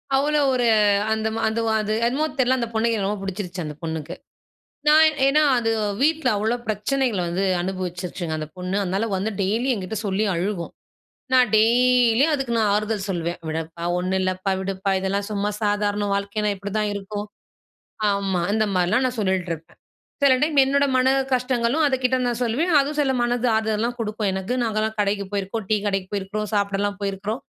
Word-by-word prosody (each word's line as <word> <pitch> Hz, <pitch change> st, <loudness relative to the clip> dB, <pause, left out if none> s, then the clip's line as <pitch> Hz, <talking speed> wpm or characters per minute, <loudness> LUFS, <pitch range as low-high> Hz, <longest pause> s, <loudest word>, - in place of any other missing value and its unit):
அவ்வளோ 295 Hz, +2 st, +2 dB
ஒரு 250 Hz, -1 st, +1 dB, 0.5 s
அந்த 220 Hz, 0 st, -1 dB
ம 225 Hz, -, -3 dB
அந்த 220 Hz, +1 st, -1 dB
ஒ -, -, +2 dB
அது 215 Hz, 0 st, -2 dB
என்னமோ 270 Hz, +6 st, +1 dB
தெரியல. 260 Hz, 0 st, +3 dB
அந்த 235 Hz, -, -1 dB
பொண்ணுக்கு 230 Hz, +1 st, +1 dB
என்ன 195 Hz, -2 st, -1 dB
ரொம்ப 205 Hz, 0 st, -2 dB
புடிச்சிருச்சு 190 Hz, -2 st, -5 dB
அந்த 150 Hz, -1 st, -6 dB
பொண்ணுக்கு. 160 Hz, -2 st, -4 dB, 0.7 s
நான் 310 Hz, 0 st, +6 dB
ஏன்னா 285 Hz, +3 st, +4 dB, 0.2 s
அது 225 Hz, -2 st, 0 dB, 0.3 s
வீட்ல 310 Hz, 0 st, +2 dB
அவ்வளோ 220 Hz, +3 st, 0 dB
பிரச்சனைகள 220 Hz, +1 st, 0 dB
வந்து 175 Hz, +3 st, -1 dB, 0.2 s
அனுபவிச்சுருச்சுங்க 180 Hz, -2 st, -4 dB
அந்த 155 Hz, -, -5 dB
பொண்ணு. 180 Hz, +1 st, -3 dB
அதனால 195 Hz, +4 st, -1 dB
வந்து 210 Hz, +4 st, -2 dB
டெய்லி 220 Hz, +7 st, 0 dB
என்கிட்ட 200 Hz, 0 st, -4 dB
சொல்லி 200 Hz, +2 st, 0 dB
அழுகும். 175 Hz, 0 st, -3 dB, 0.6 s
நான் 250 Hz, -4 st, +5 dB
டெய்லியும் 245 Hz, +4 st, +4 dB
அதுக்கு, 270 Hz, -4 st, -3 dB
நான் 220 Hz, -2 st, +2 dB
ஆறுதல் 210 Hz, -1 st, -1 dB
சொல்லுவேன். 175 Hz, -1 st, -2 dB
"விடப்பா. 160 Hz, +1 st, -5 dB
ஒண்ணும் 185 Hz, +1 st, 0 dB
இல்லைப்பா. 185 Hz, +1 st, -1 dB
விடுப்பா 195 Hz, +1 st, -2 dB
இதெல்லாம் 200 Hz, +1 st, -2 dB
சும்மா 205 Hz, 0 st, -1 dB
சாதாரணம். 205 Hz, -1 st, 0 dB
வாழ்க்கைனா 200 Hz, +1 st, -1 dB
இப்படிதான் 205 Hz, +2 st, -2 dB
இருக்கும்." 205 Hz, +1 st, -5 dB, 0.9 s
ஆமா. 195 Hz, -3 st, -1 dB
இந்த 215 Hz, 0 st, +2 dB
மாரிலாம் 185 Hz, +8 st, +2 dB
நான் 250 Hz, -1 st, -5 dB
சொல்லிட்டுருப்பேன். 180 Hz, -5 st, -2 dB, 0.4 s
சில 275 Hz, -2 st, +6 dB
டைம் 300 Hz, 0 st, +1 dB
என்னோட 280 Hz, +1 st, +2 dB
மன 255 Hz, 0 st, +3 dB, 0.3 s
கஷ்டங்களும், 250 Hz, +3 st, +1 dB
அதுக்கிட்ட 260 Hz, -1 st, +1 dB
நான் 240 Hz, -1 st, -2 dB
சொல்லுவேன். 265 Hz, +10 st, 0 dB
அதுவும் 290 Hz, +2 st, -1 dB
சில 275 Hz, -2 st, +1 dB
மனது 240 Hz, 0 st, 0 dB
ஆறுதலலாம் 220 Hz, +2 st, -1 dB
குடுக்கும் 215 Hz, -2 st, -2 dB
எனக்கு. 190 Hz, +5 st, -3 dB
நாங்கலாம் 220 Hz, -1 st, -1 dB
கடைக்கு 200 Hz, 0 st, -1 dB
போயிருக்கோம். 200 Hz, +2 st, -3 dB
டீ 215 Hz, -, +4 dB
கடைக்கு 195 Hz, -2 st, -2 dB
போயிருக்கிறோம். 205 Hz, +1 st, -3 dB
சாப்பிடலாம் 200 Hz, 0 st, 0 dB
போயிருக்கிறோம். 200 Hz, +4 st, -3 dB
210 Hz, 165 wpm, -23 LUFS, 195-240 Hz, 0.9 s, நான்